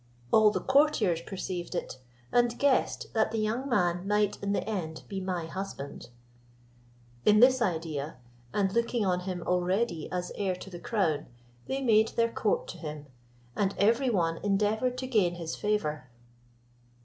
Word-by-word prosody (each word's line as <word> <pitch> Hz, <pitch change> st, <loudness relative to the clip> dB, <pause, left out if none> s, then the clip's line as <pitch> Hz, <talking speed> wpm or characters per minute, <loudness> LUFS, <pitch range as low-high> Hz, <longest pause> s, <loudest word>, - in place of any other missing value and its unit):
All 215 Hz, -1 st, +7 dB
the 210 Hz, -, -1 dB
courtiers 265 Hz, -, +3 dB
perceived 185 Hz, -1 st, -5 dB
it, 130 Hz, -, -4 dB, 0.3 s
and 240 Hz, -1 st, +2 dB
guessed 280 Hz, -2 st, +1 dB
that 220 Hz, -1 st, +2 dB
the 225 Hz, -, -3 dB
young 225 Hz, +6 st, -1 dB
man 180 Hz, -5 st, +1 dB
might 210 Hz, 0 st, +1 dB
in 200 Hz, -, -1 dB
the 205 Hz, -, -1 dB
end 170 Hz, -7 st, -4 dB
be 195 Hz, -, -4 dB
my 180 Hz, -3 st, -2 dB
husband. 165 Hz, -8 st, -6 dB, 1.1 s
In 210 Hz, 0 st, +5 dB
this 255 Hz, +1 st, +6 dB
idea, 160 Hz, -7 st, -2 dB, 0.4 s
and 195 Hz, -2 st, 0 dB
looking 235 Hz, -1 st, +1 dB
on 180 Hz, -1 st, +1 dB
him 180 Hz, -1 st, -4 dB
already 180 Hz, -1 st, 0 dB
as 180 Hz, -1 st, -3 dB
heir 190 Hz, -3 st, -1 dB
to 190 Hz, +1 st, -10 dB
the 175 Hz, -, -7 dB
crown, 170 Hz, -9 st, 0 dB, 0.4 s
they 270 Hz, 0 st, -2 dB
made 220 Hz, -3 st, +5 dB
their 230 Hz, 0 st, +2 dB
court -, -, 0 dB
to -, -, -8 dB
him, 150 Hz, -2 st, -6 dB, 0.5 s
and 200 Hz, -1 st, 0 dB
every 235 Hz, +6 st, +3 dB
one 165 Hz, -7 st, +1 dB
endeavoured 210 Hz, +6 st, 0 dB
to 260 Hz, -, -3 dB
gain 205 Hz, -9 st, +2 dB
his 165 Hz, -2 st, -4 dB
favour. 155 Hz, -11 st, -1 dB
200 Hz, 160 wpm, -29 LUFS, 175-230 Hz, 1.1 s, All